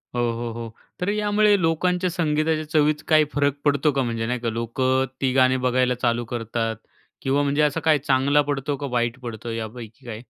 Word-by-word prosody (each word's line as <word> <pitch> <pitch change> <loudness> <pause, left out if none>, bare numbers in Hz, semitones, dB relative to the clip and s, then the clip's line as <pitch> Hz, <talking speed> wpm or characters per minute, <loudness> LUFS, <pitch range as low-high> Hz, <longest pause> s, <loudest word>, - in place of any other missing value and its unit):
हो, 120 - +1
हो, 115 0 -4
हो. 115 -1 -6 0.3
तर 180 - -1
यामुळे 210 -1 +3
लोकांच्या 180 +3 +1
संगीताच्या 155 -2 0
चवीत 150 -1 +2
काही 155 -1 +5
फरक 140 -1 +2
पडतो 145 +1 +3
का? 135 -1 0
म्हणजे 115 -1 -2
नाही 125 0 -1
का, 115 -1 -2
लोक 115 +3 -4 0.4
ती 130 -1 +2
गाणी 130 0 +4
बघायला 125 0 +2
चालू 120 -1 +1
करतात 115 -1 -2 0.5
किंवा 140 +2 +1
म्हणजे 145 +1 +1
असं 150 +2 +2
काय 155 -2 +4
चांगला 140 +1 +2
पडतो 140 +1 -2
का 140 - -4
वाईट 120 +1 -1
पडतो 115 -1 -6
यापैकी 115 +2 -7
काय? 110 -1 -7
135 Hz, 185 wpm, -23 LUFS, 120-150 Hz, 0.5 s, काही